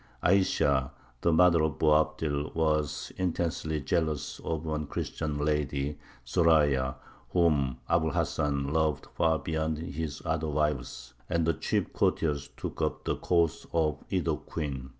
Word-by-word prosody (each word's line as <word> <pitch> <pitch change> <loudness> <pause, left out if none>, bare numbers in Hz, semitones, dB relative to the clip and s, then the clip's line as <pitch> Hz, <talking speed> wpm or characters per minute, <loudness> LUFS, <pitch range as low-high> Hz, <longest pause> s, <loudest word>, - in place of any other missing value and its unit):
Ayesha, 70 -8 +3 0.3
the 85 - +3
mother 85 0 +5
of 75 -3 0
Boabdil, 75 -1 +1
was 75 -3 0
intensely 85 -3 -1
jealous 80 0 -1
of 80 -1 -3
a 80 -1 -1
Christian 75 0 -3
lady, 75 -1 -1 0.3
Zoraya, 75 -3 +3 0.3
whom 75 -7 +2
Abu 85 -1 +2
l 75 - -2
Hasan 70 -1 0
loved 80 -3 +1
far 80 -1 +2
beyond 80 +1 -2
his 80 -3 -4
other 80 -1 -1
wives; 70 -4 -2 0.2
and 85 -2 +1
the 85 - +3
chief - - -1
courtiers 75 -3 0
took - - -5
up - - -1
the - - 0
cause 85 -3 +1
of 80 -2 +1
either - - +1
queen. 70 -5 -5
75 Hz, 135 wpm, -29 LUFS, 70-80 Hz, 0.3 s, mother